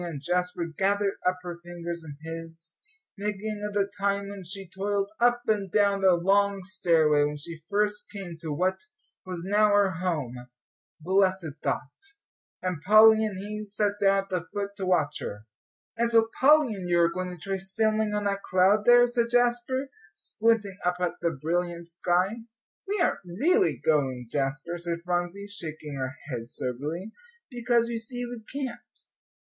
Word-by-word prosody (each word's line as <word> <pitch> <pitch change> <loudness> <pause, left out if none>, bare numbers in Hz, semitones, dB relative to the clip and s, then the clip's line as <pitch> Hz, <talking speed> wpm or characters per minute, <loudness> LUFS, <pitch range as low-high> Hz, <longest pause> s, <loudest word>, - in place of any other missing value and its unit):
And 165 -5 -5
Jasper 180 +2 -1
gathered 195 +5 0
up 185 0 +2
her 175 -1 -6
fingers 170 -1 -6
in 145 -3 -9
his, 165 0 -8 0.5
thinking 210 +1 -3
of 210 0 -4
the 200 -1 +2
time 200 0 0
when 200 -1 -8
she 195 +2 -6
toiled 200 +2 -2
up 240 0 +3
and 205 -4 0
down 200 -2 +3
the 190 -2 +5
long 195 +2 +2
stairway, 165 -6 +3
when 150 0 -1
she 160 +2 -9
first 210 0 +1
came 195 -5 -7
to 160 -3 -4
what 185 +5 0 0.5
was 180 -2 -5
now 210 +2 +4
her 205 -2 +4
home, 135 -9 -3 0.5
blessed 185 -2 +1
thought! 145 - -2 0.7
and 180 -5 -2
Polly 220 +3 +7
and 210 -3 -2
he 210 +2 -5
sat 205 0 0
down 195 0 +4
at 195 - -21
the 180 -2 -2
foot 200 -1 -3
to 190 -2 -3
watch 155 -5 +1
her. 105 +1 -6 0.5
"And 235 0 +1
so 225 -1 +4
Polly 290 -3 +5
and 185 -3 -6
you 175 0 +3
are 170 0 +3
going 185 -1 -3
to 180 - -8
try 195 +3 -3
sailing 215 +2 0
on 210 - -1
that 200 -1 -1
cloud 195 +3 +3
there," 245 0 +8
said 240 -1 0
Jasper, 245 +2 +1 0.2
squinting 210 +4 0
up 180 0 +1
at 180 -2 +1
the 170 - +2
brilliant 170 +3 -2
sky. 180 +5 +1 0.5
"We 410 +1 -1
aren't 350 - +2
really 310 - +2
going, 130 -6 +1
Jasper," 145 +5 -1
said 170 -1 -1
Phronsie, 175 +2 -2
shaking 155 -6 -6
her 130 0 -4 0.2
head, 120 -1 -5
soberly, 150 - -4 0.4
"because 240 -1 +1
you 230 -1 -2
see 245 +2 -5
we 240 -1 -7
can't. 265 -3 -6
190 Hz, 170 wpm, -27 LUFS, 170-210 Hz, 0.7 s, there